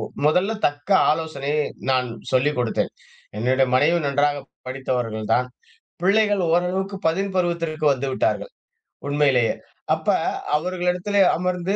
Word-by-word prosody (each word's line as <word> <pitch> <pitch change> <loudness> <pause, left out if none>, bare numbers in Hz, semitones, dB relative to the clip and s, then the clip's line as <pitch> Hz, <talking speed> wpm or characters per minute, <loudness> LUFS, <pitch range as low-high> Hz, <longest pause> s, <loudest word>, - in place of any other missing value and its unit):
ஒ - - -5 0.2
மொதல்ல 180 +8 +3
தக்க 145 +6 -5 0.2
ஆலோசனையை 150 -2 -1 0.3
நான் 130 -1 +2 0.2
சொல்லிக் 135 +3 +2
கொடுத்தேன். 120 -2 0 0.5
என்னுடைய 130 +3 +2
மனைவி 160 +6 +4
நன்றாக 145 +1 +1 0.3
படித்தவர்கள் 125 -5 -3
தான் 125 0 +1 0.6
பிள்ளைகள் 205 +1 +3
ஓரளவுக்கு 185 +3 0
பதின் 195 +4 0
பருவத்திற்கு 170 -3 -1
வந்துவிட்டார்கள். 135 - -1 0.6
உண்மையிலேயே 140 -5 +2 0.4
அப்ப - - -11 0.5
அவர்களிடத்திலே 180 +4 0 0.2
அமர்ந்து 180 +2 -1
155 Hz, 105 wpm, -22 LUFS, 135-180 Hz, 0.6 s, மனைவி